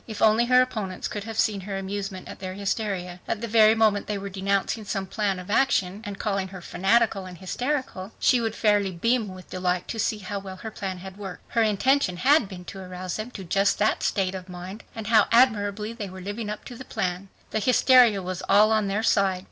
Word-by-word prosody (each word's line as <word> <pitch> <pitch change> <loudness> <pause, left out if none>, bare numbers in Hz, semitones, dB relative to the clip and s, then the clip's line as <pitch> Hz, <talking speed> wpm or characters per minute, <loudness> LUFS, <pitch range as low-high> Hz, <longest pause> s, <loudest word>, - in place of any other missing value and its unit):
If 215 -2 -6
only 220 +2 +4
her 250 0 +6
opponents 210 -7 -4
could 205 -1 -5
have 225 -1 -6
seen 205 -3 +1
her 195 +1 -5
amusement 195 -1 -5
at - - -9
their 185 -1 -5
hysteria. 195 -3 -3
At 220 - -1
the 235 - -4
very 220 0 +6
moment 215 -2 +2
they 210 - -2
were 200 0 -5
denouncing 195 +3 -1
some 195 -1 -3
plan 200 0 -1
of 185 +2 -7
action 210 -6 +2
and 205 -3 -6
calling 195 -3 -1
her 185 0 -9
"fanatical" 195 +1 +1
and 180 -1 -10
"hysterical" 225 - -3
she 250 -2 +3
would 225 -1 -2
fairly 205 -3 +2
beam 230 +6 +1
with 185 -1 -11
delight 180 -1 -1
to 225 - -4
see 220 0 0
how 200 0 -5
well 190 -1 -8
her 220 +4 -7
plan 190 -2 -5
had 190 +1 -10
worked. 190 -4 -8
Her 230 - +1
intention 220 -1 +2
had 265 - +4
been 180 -2 -9
to 195 - -8
arouse 185 -1 -5
them 215 +2 -5
to 205 -6 -8
just 195 +3 +2
that 215 +1 +1
state 190 -2 0
of 185 -1 -7
mind, 180 +4 -8
and 220 -2 -6
how 215 -1 +4
admirably 215 -3 +3
they 210 -4 -6
were 185 +1 -9
living 205 +3 -5
up 210 - -6
to 245 - -8
the 255 - -8
plan. 185 -3 -3 0.2
The 220 - 0
hysteria 245 -3 +5
was 185 0 -4
all 210 +2 +6
on 215 -2 +2
their 205 +3 -1
side. 195 -4 +2
200 Hz, 225 wpm, -25 LUFS, 190-220 Hz, 0.2 s, her